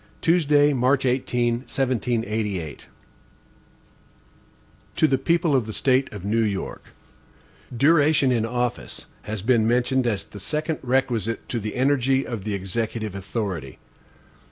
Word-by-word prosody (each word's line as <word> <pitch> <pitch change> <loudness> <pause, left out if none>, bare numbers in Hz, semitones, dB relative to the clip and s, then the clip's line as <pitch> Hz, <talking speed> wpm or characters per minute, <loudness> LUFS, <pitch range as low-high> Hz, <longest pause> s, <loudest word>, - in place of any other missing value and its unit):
Tuesday, 150 -3 +3
March 130 +1 +2
18, 125 -2 +1
1788. 115 -5 -1
HAMILTON 75 - -11 2.1
To 155 - +4
the 135 -3 +1
People 165 0 +2
of 120 -5 +1
the 110 - -5
State 130 +2 +2
of 100 -3 -8
New 110 +3 +1
York: 100 -3 -3 0.9
DURATION 145 -1 +4
in 115 -3 +1
office 120 +1 -3 0.2
has 105 -2 -5
been 115 -2 +3
mentioned 125 +2 +2
as 105 -4 -1
the 105 - -12
second 155 - -2
requisite 120 -3 -1
to 120 - -1
the 105 0 -5
energy 135 0 +2
of 110 -5 -5
the 105 -2 -1
Executive 110 +2 -3
authority. 95 - -4
120 Hz, 130 wpm, -24 LUFS, 110-135 Hz, 2.1 s, To